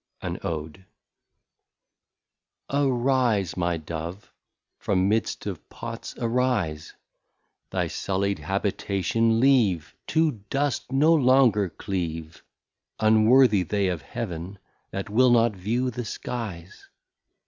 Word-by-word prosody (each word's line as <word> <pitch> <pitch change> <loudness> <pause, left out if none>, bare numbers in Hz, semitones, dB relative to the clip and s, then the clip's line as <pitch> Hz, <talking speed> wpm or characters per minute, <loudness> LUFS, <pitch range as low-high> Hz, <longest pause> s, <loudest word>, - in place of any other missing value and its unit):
An - - -4
ODE. 80 +3 -5 1.9
Arise 125 - +1
my 85 -1 0
Dove, 85 +4 -7 0.5
from 95 -1 +1
mid'st 110 +2 -1
of - - -6
Pots 115 0 -7
arise, 115 -11 -1 0.7
Thy - - -1
sully'd 100 +1 -2
Habitation 100 +3 0
leave, 105 - +3
To 155 -9 +1
Dust 140 -2 -1
no 150 +5 +4
longer 130 - +4
cleave, 80 -3 -5 0.6
Unworthy 110 0 +5
they 95 +2 0
of 85 -4 -3
Heaven 95 - -6 0.3
that 95 - -5
will 125 +4 +5
not 120 -1 +4
view 120 +7 -1
the 120 +1 -4
Skies. 100 -6 -6
105 Hz, 100 wpm, -25 LUFS, 90-125 Hz, 1.9 s, Unworthy